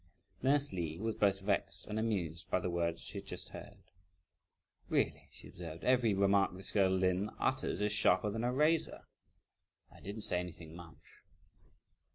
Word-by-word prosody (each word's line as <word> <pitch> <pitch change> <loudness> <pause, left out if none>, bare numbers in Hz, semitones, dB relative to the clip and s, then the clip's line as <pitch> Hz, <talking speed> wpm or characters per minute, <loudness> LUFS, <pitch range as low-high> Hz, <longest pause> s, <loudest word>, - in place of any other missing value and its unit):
Nurse 140 -1 +2
Li 85 -3 -3
was 110 +4 -1
both 100 -2 +2
vexed 95 -1 -1
and 105 +1 -3
amused 90 -7 -2
by - - +2
the 90 - -2
words 85 -1 -1
she - - -5
had - - -13
just - - -5
heard. - - -11 1.1
"Really," - - 0
she - - -12
observed, 85 -2 -8
"every 125 -5 +3
remark 100 -1 +3
this 95 - -4
girl 100 -3 +4
Lin 95 +2 +1
utters 130 -4 0
is 105 0 +2
sharper 105 -1 +4
than 115 +2 -3
a 120 - +1
razor! 150 +5 +2 0.9
I - - -12
didn't 100 +3 -6
say 90 - +1
anything 85 -2 -8
much!" 85 -1 -12
100 Hz, 165 wpm, -34 LUFS, 90-110 Hz, 1.1 s, girl